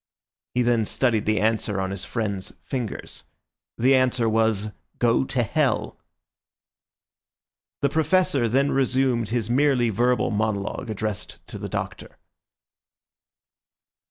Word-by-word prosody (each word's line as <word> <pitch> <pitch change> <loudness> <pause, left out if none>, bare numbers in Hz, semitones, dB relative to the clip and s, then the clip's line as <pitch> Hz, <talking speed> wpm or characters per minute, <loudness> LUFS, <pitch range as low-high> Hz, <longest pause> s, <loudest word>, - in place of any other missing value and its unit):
He 125 - +3
then 120 -2 +2
studied 115 -2 +1
the 110 -2 +2
answer 110 -1 0
on 95 0 -2
his 100 0 -5
friend's 100 -5 -3
fingers. 125 -6 -5 0.5
The 130 +4 +4
answer 130 -2 +2
was, 110 -1 +1 0.3
"Go 120 +2 +2
to 130 -2 0
hell!" 105 - 0 1.8
The 140 - +4
Professor 160 -4 +2
then 140 +4 +2
resumed 130 -3 +1
his 115 -2 -1
merely 125 -1 +3
verbal 125 +3 +1
monologue 110 +2 -2
addressed 105 -2 -4
to - - -6
the - - -5
Doctor. - - -5
120 Hz, 115 wpm, -24 LUFS, 110-130 Hz, 1.8 s, The